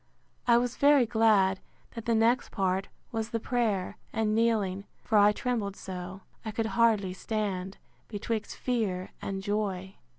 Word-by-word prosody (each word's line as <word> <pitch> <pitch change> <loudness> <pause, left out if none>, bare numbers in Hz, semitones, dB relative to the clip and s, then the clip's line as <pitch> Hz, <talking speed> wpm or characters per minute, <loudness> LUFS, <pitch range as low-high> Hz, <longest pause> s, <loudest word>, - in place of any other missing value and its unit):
I 235 -1 +6
was 245 0 -1
very 285 -3 +6
glad, 215 -4 +3 0.3
that 230 -2 -7
the 230 - +2
next 230 +3 +3
part 190 0 0 0.2
was 225 -1 -2
the 230 -1 -2
prayer, 220 -6 -1
and 220 -1 0
kneeling; 210 -4 +1 0.2
for 220 - -1
I 205 +1 +7
trembled 215 -4 -2
so, 185 0 -7 0.2
I 220 - -4
could 225 +1 -1
hardly 220 -5 +3
stand, 195 -2 -3 0.3
betwixt 220 +1 -3
fear 205 -7 -1
and 195 -1 -4
joy. 195 -2 -2
215 Hz, 145 wpm, -29 LUFS, 195-230 Hz, 0.3 s, I